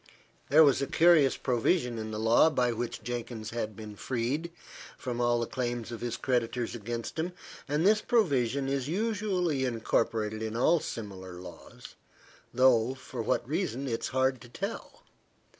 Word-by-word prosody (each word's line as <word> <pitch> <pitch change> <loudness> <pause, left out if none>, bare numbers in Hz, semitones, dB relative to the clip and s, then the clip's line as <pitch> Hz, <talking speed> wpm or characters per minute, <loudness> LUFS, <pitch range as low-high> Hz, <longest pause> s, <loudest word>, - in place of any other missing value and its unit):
There 155 +3 +8
was 140 -3 +4
a 140 - -1
curious 160 -4 +5
provision 125 0 +1
in 110 0 -4
the 110 - -4
law 115 +8 +5
by 125 -5 +1
which 120 0 -4
Jenkins 120 -2 -5
had 110 -2 -3
been 110 -1 -9
freed 130 +9 -2 0.5
from 120 -2 -3
all 120 0 +2
the 115 - 0
claims 120 -2 -3
of 115 - -6
his 120 -1 -3
creditors 120 -1 -1
against 120 +5 -5
him; 175 +3 -2 0.3
and 150 +4 0
this 215 +1 +5
provision 140 - +1
is 135 -1 -1
usually 185 -6 0
incorporated 110 -2 0
in 110 0 -3
all 160 +8 +4
similar 95 -8 -7
laws, 90 -2 -11 0.6
though 130 -1 +4
for 130 - -7
what - - 0
reason 135 +5 -2
it 115 -2 -1
is - - -2
hard 130 -1 +1
to 120 - -13
tell. 200 - -6
125 Hz, 160 wpm, -29 LUFS, 115-140 Hz, 0.6 s, There